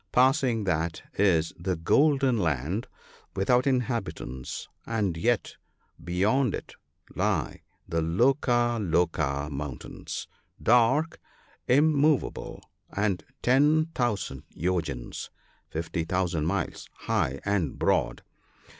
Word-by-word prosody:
Passing 130 -3 +3
that 85 -3 -1
is 85 -5 +2
the 90 +1 -1
Golden 135 - +3
Land, 80 - -1 0.5
without 125 +7 +2
inhabitants, 115 - -2 0.2
and 105 -7 0
yet 115 +6 0 0.5
beyond 100 +8 +1
it - - -8 0.4
lie - - -1 0.3
the 85 0 0
Loka 120 - +2
loka 80 -6 0
mountains, 70 -2 -6 0.3
dark, 125 +7 +3 0.5
immovable, 150 +1 +2 0.3
and 100 -3 0 0.2
10,000 130 - +2
yojans 80 -8 -3 0.4
(50,000 85 0 -1
miles) 100 -1 -2
high 70 +1 0
and 100 -7 0
broad. - - +1
100 Hz, 85 wpm, -27 LUFS, 80-125 Hz, 0.5 s, Passing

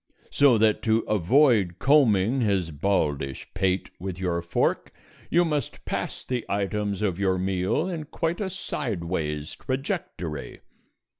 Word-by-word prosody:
So 140 -5 +5
that 110 0 +3
to 110 0 +2
avoid 105 - +3
combing 125 -4 +4
his 95 -7 +1
baldish 75 -5 -1
pate 95 -1 0
with 95 -1 -5
your 90 -2 -1
fork 85 - 0 0.4
you 175 +1 +4
must 150 -3 -3
pass - - -4
the 125 -2 -2
items 100 0 -1
of 95 -3 0
your 95 -2 +2
meal 95 - 0
in 165 -5 -4
quite 165 +4 -2
a 195 - -1
sideways 85 - -3
trajectory. 130 - -4
100 Hz, 130 wpm, -26 LUFS, 90-135 Hz, 0.4 s, So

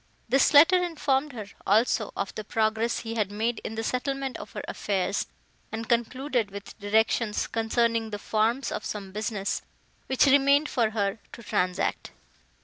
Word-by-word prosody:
This 265 +4 +4
letter 335 +5 +7
informed 295 -4 0
her, 220 -4 -6 0.2
also, 215 +1 +2
of - - -3
the 215 - -5
progress 220 +2 0
he 225 -1 -5
had 210 -3 -1
made 225 +2 -1
in 220 - -5
the 225 - -3
settlement 270 +2 -2
of - - -10
her - - -5
affairs, 195 -1 -1 0.4
and 225 0 -4
concluded 240 0 0
with 200 0 -9
directions, 215 +1 +1
concerning 230 0 0
the 205 - -4
forms 225 +5 0
of - - -4
some 200 -2 -5
business, 210 -1 -2 0.5
which 265 +1 +3
remained 280 +2 +4
for 230 -4 +1
her 205 -1 -1
to 235 - -10
transact. 180 -3 -1
225 Hz, 155 wpm, -27 LUFS, 210-260 Hz, 0.5 s, letter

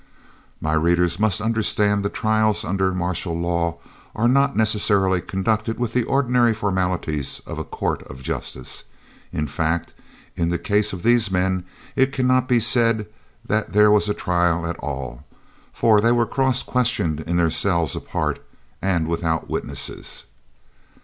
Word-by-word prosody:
My 80 0 -1
readers 85 +2 +2
must 110 -1 +1
understand 105 -2 +1
that 100 - -3
trials 110 0 +1
under 95 0 0
martial 90 -2 -2
law 85 -1 -1 0.4
are 115 +2 +2
not 140 +2 +3
necessarily 100 -4 +2
conducted 110 +4 -1
with 120 -2 -2
the 125 - +2
ordinary 125 -4 +2
formalities 90 -8 -1
of - - -6
a - - -2
court - - -3
of 65 0 -11
justice; 65 0 -5 0.5
in 75 - -2
fact, 80 +4 -2 0.4
in 85 -1 0
the 85 - 0
case 105 +4 0
of 90 -2 -7
these 120 -3 +3
men 95 -1 0 0.3
it 130 0 +3
cannot 130 -1 +2
be 120 -2 +4
said 115 -1 +3 0.4
that 110 -3 -1
there 105 0 +6
was 105 0 +3
a 105 - 0
trial 85 -2 +1
at 85 0 -3
all, 65 -4 -5 0.5
for 110 -2 +3
they 115 +2 +3
were 120 -1 +3
cross 130 0 +1
questioned 115 -12 0
in 85 +3 -2
their 85 -2 +2
cells 85 -4 0
apart, - - -3 0.4
and 90 -4 0
without 80 -1 -1
witnesses. - - -4
100 Hz, 150 wpm, -22 LUFS, 85-115 Hz, 0.5 s, there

